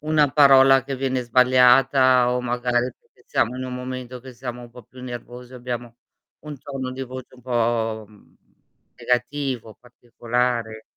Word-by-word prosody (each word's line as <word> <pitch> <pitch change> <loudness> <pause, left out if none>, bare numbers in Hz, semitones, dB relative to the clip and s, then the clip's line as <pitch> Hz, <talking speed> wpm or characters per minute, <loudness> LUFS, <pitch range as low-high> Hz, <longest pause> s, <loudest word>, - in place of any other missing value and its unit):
una 150 -2 +2
parola 135 -2 +6
che 135 -1 -5
viene 130 -1 -1
sbagliata, 125 +1 +4
o 125 - -1
magari 125 0 -1
perchè - - -30
siamo 125 +3 0
in 130 - -5
un 125 0 -6
momento 125 -1 -7
che 130 0 -12
siamo 125 0 -7
un 120 - -13
po' 125 +1 -13
più 125 +3 -15
nervosi, 125 0 -9
abbiamo 120 -1 -6 0.5
un 150 -2 -9
tono 130 -1 -6
di 130 +1 -6
voce 130 0 -9
un 125 - -18
po', 115 -2 -1
mhmm, 105 -1 -22 0.6
negativo, 125 -2 -2
particolare. 120 -2 -3
125 Hz, 155 wpm, -22 LUFS, 120-130 Hz, 0.6 s, parola